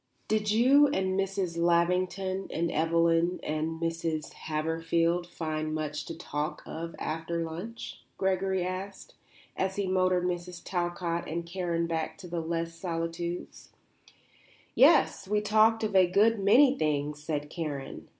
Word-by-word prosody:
"Did 215 -1 +1
you 260 +7 +6
and 190 -9 0
Mrs. 195 -3 -1
Lavington 180 +3 +1
and 170 0 -1
Evelyn 165 +2 +2
and 155 +1 -2
Mrs. 165 -2 -2
Haverfield 165 +2 0
find 155 -2 -3
much 150 -1 -3
to 165 - -7
talk 150 -3 -4
of 165 +1 -6
after 165 +1 -3
lunch?" 180 +9 -7 0.2
Gregory 190 -1 0
asked, 190 +1 -6 0.4
as 190 0 -1
he 200 - -1
motored 185 -1 +2
Mrs. 175 0 -4
Talcott 175 -1 -2
and 170 +2 -3
Karen 170 -1 -1
back 165 -1 -3
to 195 -2 -10
Les 165 0 -2
Solitudes. 165 0 -5 1.0
"Yes; - - +5
we 210 +1 +2
talked 220 +2 +3
of 210 -2 -1
a 185 -1 +6
good 215 +4 +4
many 250 +8 +6
things," 150 - -1
said 150 -1 -3
Karen. 150 -5 -5
170 Hz, 130 wpm, -29 LUFS, 165-190 Hz, 1.0 s, you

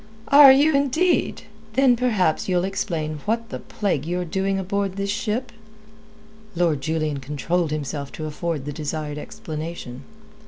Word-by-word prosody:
"Are 280 -1 +10
you, 290 +4 +5
indeed! 285 +6 +1 0.3
Then 260 0 +4
perhaps 210 -10 +1
ye'll 180 -1 +2
explain 170 -6 -2
what 230 +1 -1
the - - -5
plague 190 -10 -2
you're 180 +1 -1
doing 195 +3 -1
aboard 195 0 -2
this 200 0 -2
ship?" 230 +4 -2 1.0
Lord 165 -5 +1
Julian 155 -1 -1
controlled 150 +5 -1
himself 145 -1 -4
to 155 - -5
afford 155 -1 -3
the 145 - -4
desired 150 0 -4
explanation. 155 -6 -7
175 Hz, 135 wpm, -23 LUFS, 155-210 Hz, 1.0 s, Are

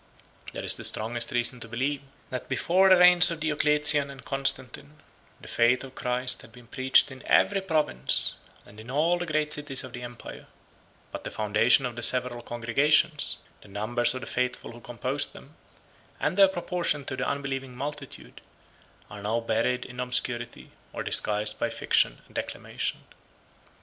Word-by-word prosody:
There - - -6
is - - +4
the - - -8
strongest 115 +2 -1
reason 120 0 0
to 115 - -8
believe, 135 +5 -2 0.3
that 125 - -6
before 190 +3 +3
the 185 - +7
reigns 180 0 +8
of 165 -1 -4
Diocletian 150 -1 +2
and 135 -1 -12
Constantine, 135 +1 -2 0.4
the - - -13
faith 120 +2 +2
of 135 -1 -10
Christ 125 0 -1
had - - -16
been 120 +1 -16
preached 130 +3 +3
in 130 -1 -11
every 195 -1 +3
province, 155 - +1 0.3
and 105 +1 -15
in 110 +3 -11
all 165 +6 +1
the 175 - -4
great 155 -1 -1
cities 145 -3 -1
of 130 - -10
the 120 - -7
empire; 120 -1 -10 0.6
but - - -7
the - - -5
foundation 110 +5 +2
of 120 -2 -4
the 120 - -6
several 125 0 +1
congregations, 140 +6 +1 0.2
the - - -16
numbers 120 +5 +1
of 130 - -5
the - - -7
faithful 125 0 -3
who 120 - -12
composed 120 -2 -2
them, - - -14 0.7
and - - -1
their 195 0 +7
proportion 175 -5 -1
to 130 - -4
the 130 +1 -3
unbelieving 135 -2 -4
multitude, 145 0 -8 0.7
are 105 - -10
now 110 +3 -1
buried 115 +2 -1
in 125 0 -11
obscurity, 120 -1 -2 0.2
or - - -4
disguised 105 0 +1
by - - 0
fiction - - +1
and - - -22
declamation. - - -4
130 Hz, 170 wpm, -26 LUFS, 120-150 Hz, 0.7 s, reigns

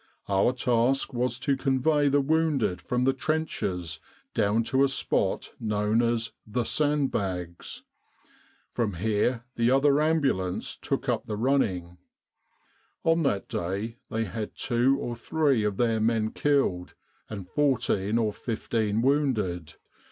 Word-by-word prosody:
Our 100 +4 +3
task 125 +2 +1
was 120 -1 0
to 140 0 +1
convey 140 +2 +2
the 145 +1 +3
wounded 150 - +1
from 125 0 -1
the 135 +1 +3
trenches 95 - -2 0.3
down 110 +1 +2
to 130 +4 +2
a - - +5
spot 135 - -1
known 105 +1 +1
as 115 -1 +1
4 - - -33
The 120 +3 -1
Sandbags.' 100 - -1 0.9
From 115 -4 0
here 110 +5 0
the 115 0 +3
other 140 +2 +4
ambulance 140 - 0
took - - -3
up - - -1
the 105 - -3
running. 95 -9 0 1.0
On 165 +1 +3
that 105 -10 0
day 100 +7 -3
they 115 0 -1
had 110 +1 -5
two 130 +2 +2
or 120 - -4
three 140 -1 +1
of 105 -2 -1
their 115 -2 +2
men 110 0 +1
killed, 135 -12 0 0.3
and 100 -4 -6
14 115 -5 +1
or 110 -3 +1
15 110 -1 -1
wounded. 105 - 0
115 Hz, 135 wpm, -27 LUFS, 105-135 Hz, 1.0 s, a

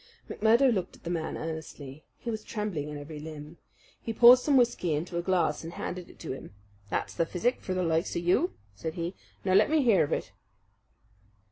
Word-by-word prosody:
McMurdo 235 +4 +4
looked 190 -4 -3
at - - -22
the 170 - -3
man 160 -2 -2
earnestly. 155 -3 -7
He 235 - -4
was 215 -1 -4
trembling 200 -9 -3
in 150 - -6
every 150 +1 -8
limb. 155 +1 -9 0.4
He 230 - -4
poured 245 +2 +9
some 280 +1 +3
whisky 230 -10 +2
into 170 +4 -4
a 170 - +1
glass 175 -4 +1
and 165 +1 -7
handed 180 -1 -5
it - - -16
to 160 - -5
him. 130 -6 -8 0.3
"That's - - -2
the - - +1
physic 190 +9 -1
for 185 - -3
the 185 - 0
likes 165 0 0
of 170 - -1
you," 175 +1 +2 0.2
said 160 +11 -5
he. 170 +1 -3 0.3
"Now 185 - +2
let 205 +3 +5
me 310 -2 +3
hear 225 -6 +5
of 145 - -3
it." - - -2
175 Hz, 210 wpm, -29 LUFS, 160-215 Hz, 0.4 s, poured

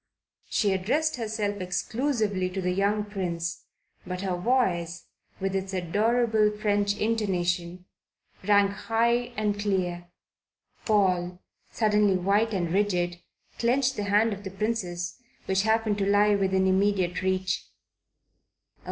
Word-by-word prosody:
She 205 -3 +2
addressed 265 +12 0
herself 215 -3 -2
exclusively 205 0 -1
to 185 +1 -5
the 180 -1 0
young 200 +3 +1
Prince; 175 -5 -4 0.4
but 180 0 -5
her 190 -2 -1
voice, 175 -6 0 0.3
with 195 0 -2
its 190 0 -3
adorable 215 +4 +2
French 205 -1 +1
intonation, 180 -5 -1 0.6
rang 200 0 +4
high 235 +4 0
and 210 -1 0
clear. 180 -4 -1 0.8
Paul, 180 -4 +1 0.3
suddenly 210 -3 +2
white 200 +5 +2
and 175 -4 -1
rigid, 175 -3 0 0.4
clenched 260 +3 +2
the 205 - -3
hand 210 +2 +3
of 200 0 -8
the 195 - -5
Princess 190 -2 -3 0.2
which 190 0 +1
happened 220 -1 +1
to 195 - 0
lie 205 +1 +4
within 190 -1 +2
immediate 190 -2 +1
reach. 185 0 -1
200 Hz, 120 wpm, -27 LUFS, 185-215 Hz, 0.8 s, rang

